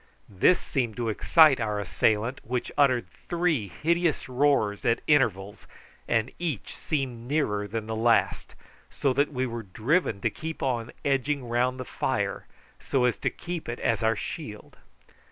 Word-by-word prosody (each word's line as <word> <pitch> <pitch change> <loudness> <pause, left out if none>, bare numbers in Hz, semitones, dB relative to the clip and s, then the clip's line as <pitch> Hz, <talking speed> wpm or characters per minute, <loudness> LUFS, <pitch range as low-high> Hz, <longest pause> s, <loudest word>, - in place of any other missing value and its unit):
This 105 - +4
seemed 120 -6 -2
to 120 -2 -1
excite 145 +5 +5
our 105 -2 -1
assailant, 110 +5 0
which 125 +1 -3
uttered 130 -4 +3 0.2
three 170 - +1
hideous 165 - 0
roars 125 -6 +1
at 115 - +2
intervals, 105 -9 +1 0.4
and 115 +2 +1
each 160 - -3
seemed 130 -6 -3
nearer 105 -9 0
than 110 +1 -4
the 110 0 -4
last, 110 -4 +1 0.3
so 135 -2 0
that 140 +3 +1
we 130 -2 -1
were 120 -2 -4
driven 110 - 0
to - - +1
keep 160 0 -6
on 120 -4 -1
edging 140 -1 0
round 125 +2 0
the 130 - -4
fire - - -2 0.3
so 130 -2 +1
as 125 - +1
to - - 0
keep 175 -6 -6
it 120 - -4
as 115 -1 0
our 110 0 +2
shield. - - -7
125 Hz, 155 wpm, -27 LUFS, 110-145 Hz, 0.4 s, excite